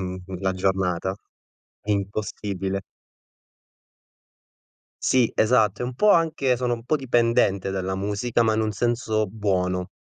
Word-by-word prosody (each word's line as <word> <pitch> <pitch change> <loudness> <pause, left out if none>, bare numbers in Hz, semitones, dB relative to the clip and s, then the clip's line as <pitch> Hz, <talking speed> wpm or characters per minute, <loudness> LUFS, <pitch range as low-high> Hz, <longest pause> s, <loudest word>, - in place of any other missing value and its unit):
mhmm 95 0 -5 0.2
la 95 -1 0
giornata. 95 -1 0 0.7
Impossibile. 100 -1 -2 2.2
Sì, 125 -3 +3
esatto, 110 0 +3
è - - 0
un 125 0 -5
po' 210 +10 +4
anche 155 -6 +2
sono 125 0 0
un 115 - -9
po' 155 +5 +1
dipendente 115 -7 +1
dalla 95 0 -2
musica 105 +4 0
ma 110 -1 +2
in 110 - +1
un 110 - 0
senso 110 -1 0
buono. 90 -3 -1
105 Hz, 125 wpm, -24 LUFS, 95-120 Hz, 2.2 s, po